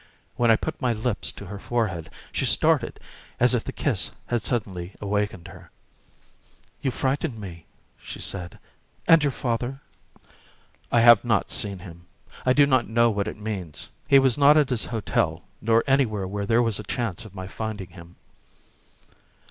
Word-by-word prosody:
When 120 -1 +2
I 115 - +7
put 155 +7 -5
my 125 -3 +2
lips 110 0 -2
to 100 - -10
her 100 +2 -7
forehead 95 -9 -2 0.2
she - - 0
started - - +2 0.4
as - - +5
if - - +1
the - - -5
kiss - - -1 0.2
had 120 -2 -1
suddenly 95 -7 -3
awakened 105 -3 -2
her. 90 -2 -14 1.1
"You 135 - 0
frightened 135 +1 -1
me," 90 -6 -9 0.3
she - - -9
said. 90 -3 -3 0.5
"And 165 -1 +7
your 145 - +3
father?" 125 +2 -3 1.1
"I 120 - +4
have 120 -2 +8
not 110 -4 +1
seen 100 -2 -1
him. 85 -1 -12 0.4
I 130 - +6
do 145 +1 +6
not 130 -4 +2
know 115 +1 +4
what 100 0 -1
it 110 - -5
means. 100 -8 -6 0.2
He 140 -2 +7
was 135 -1 +3
not 145 +2 +7
at 150 -3 +3
his 120 -3 0
hotel, 90 -7 -1 0.2
nor 115 +1 +3
anywhere 115 -8 +1
where 100 +1 -4
there 115 +2 +4
was 115 -3 -1
a - - -5
chance 115 -1 -3
of 105 -3 -13
my 95 -1 -6
finding 105 -1 -5
him." 85 -1 -13
110 Hz, 170 wpm, -25 LUFS, 95-120 Hz, 1.1 s, have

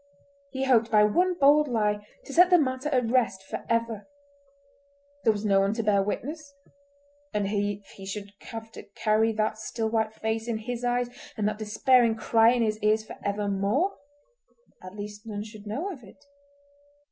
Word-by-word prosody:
He 265 -1 -3
hoped 235 -3 +3
by 210 -1 +5
one 355 - +2
bold 295 0 +5
lie 210 -4 0 0.2
to 275 - -8
set 355 +3 +6
the 360 - +7
matter 265 -2 0
at 250 -5 +1
rest 230 -7 +1
for - - -6
ever. 230 -2 -1 1.2
There 225 - +5
was 210 0 -4
no 195 -2 +4
one 195 +2 +1
to 225 - -1
bear 205 -2 +3
witness—and 285 0 -7
if 205 0 -2
he 195 - -12
should 200 0 -6 0.2
have 225 -1 -7
to - - -9
carry 220 +1 +2
that 215 0 -1
still 220 0 -3
white 220 -1 0
face 220 +1 -2
in 230 -2 -1
his 240 +2 -5
eyes 245 0 0 0.3
and 210 -1 +1
that 215 0 -2
despairing 230 +2 +3
cry 225 +1 +4
in 240 -1 +2
his 215 -1 -1
ears 215 0 +2
for - - -9
evermore—at 280 - -4
least 210 +1 -8
none 205 -1 -4
should 215 -1 -12
know 300 - -3
of 275 -9 -10
it. 280 +8 -17
225 Hz, 170 wpm, -27 LUFS, 210-270 Hz, 1.2 s, the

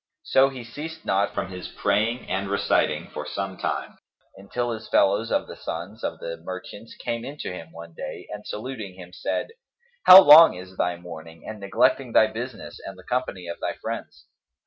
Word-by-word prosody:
So 135 +1 +4
he 130 -3 -8
ceased 160 +7 -8
not 100 +1 +1
from 95 - -2
his 90 -1 -7
praying 110 +5 0
and 95 +1 -2
reciting 100 0 +1
for - - -4
some 95 -1 -4
time, - - -4 0.4
until 120 +5 -3
his 110 -1 -7
fellows 100 +4 +3
of - - +1
the - - -10
sons 90 +7 -7
of - - -2
the 85 0 -6
merchants 95 +6 -9
came 115 0 -4
in 140 +4 -7
to 90 - -5
him 80 -2 -9
one 85 0 -11
day - - -7
and 105 0 -7
saluting 105 -4 -6
him, 90 -1 -12
said, - - -2 0.6
"How 185 +1 +14
long 150 - +9
this 95 0 -11
thy 90 -1 0
mourning 80 -1 -11
and 110 -1 -7
neglecting 120 +5 +1
thy 110 - +7
business 115 +2 -7
and 95 -1 -8
the 95 - -14
company 120 -7 -3
of 85 - -6
thy - - -2
friends? - - -7
100 Hz, 190 wpm, -25 LUFS, 90-120 Hz, 0.6 s, How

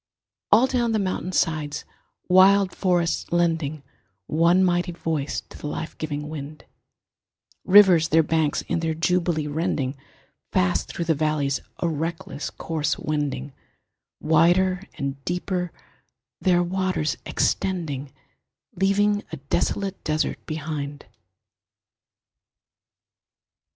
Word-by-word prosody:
All 225 +5 +7
down 240 -3 0
the - - +2
mountain 185 -2 -2
sides 150 -4 -1 0.4
wild 190 +1 +5
forests 175 -4 0
lending 165 -4 0 0.4
One 170 - +3
mighty 175 -1 +1
voice 160 -4 -2
to - - -14
the - - -5
life 155 +2 -5
giving 150 -1 -3
wind, 150 0 -8 1.0
Rivers 185 -5 +7
their 160 +1 +4
banks 155 -1 0
in 170 - -1
their 160 -1 -1
jubilee 170 -1 +1
rending, 145 -3 -1 0.6
Fast 90 -1 +1
through 170 - -4
the 165 - +3
valleys 150 -2 0 0.2
a 170 - -1
reckless 160 -2 -3
course 160 -2 -2
wending, 145 -3 -3 0.7
Wider 175 +4 +3 0.2
and 140 -2 -4
deeper 180 +1 -2 0.7
their 175 -2 +3
waters 185 -4 -1
extending, 150 -8 -1 0.6
Leaving 205 +2 +2
a - - -5
desolate 190 +7 -2
desert 155 +1 -1
behind. 150 -2 -5
165 Hz, 105 wpm, -24 LUFS, 150-180 Hz, 1.0 s, All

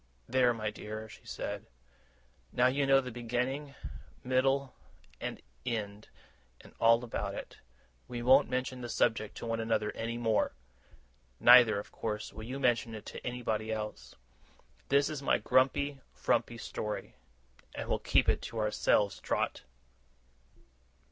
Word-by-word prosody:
'There, 125 -1 +4
my 110 -2 -2
dear!' 110 +1 -7
she - - -14
said. - - -5 0.8
'Now 125 - +3
you 135 +2 +2
know 135 0 +6
the 125 -1 -6
beginning, 125 +5 -2 0.5
middle, 135 +1 +1 0.5
and - - -4 0.2
end, 105 -4 -4 0.5
and - - -16
all 115 +1 +5
about 105 -4 -3
it. - - -8 0.5
We 120 -1 -5
won't 130 +3 +6
mention 125 0 -2
the 120 - -5
subject 110 -2 0
to - - -6
one 115 0 -1
another 110 -2 0
any 115 +1 -4
more; 115 -2 +1 0.9
neither, 120 -3 +8
of 100 - -6
course, 105 -1 -4
will 110 +1 -8
you 130 +4 -5
mention 120 -3 +1
it 110 - -9
to - - -8
anybody 110 -3 -2
else. 105 -1 -5 0.7
This 140 0 +4
is 150 -3 -4
my 140 - +3
grumpy, 135 +2 +2
frumpy 120 - 0
story, 105 -2 -5 0.6
and - - -4
we'll - - 0
keep - - +3
it - - +2
to 115 - -7
ourselves, 105 -2 +2
Trot! - - -1
120 Hz, 140 wpm, -32 LUFS, 110-130 Hz, 0.9 s, neither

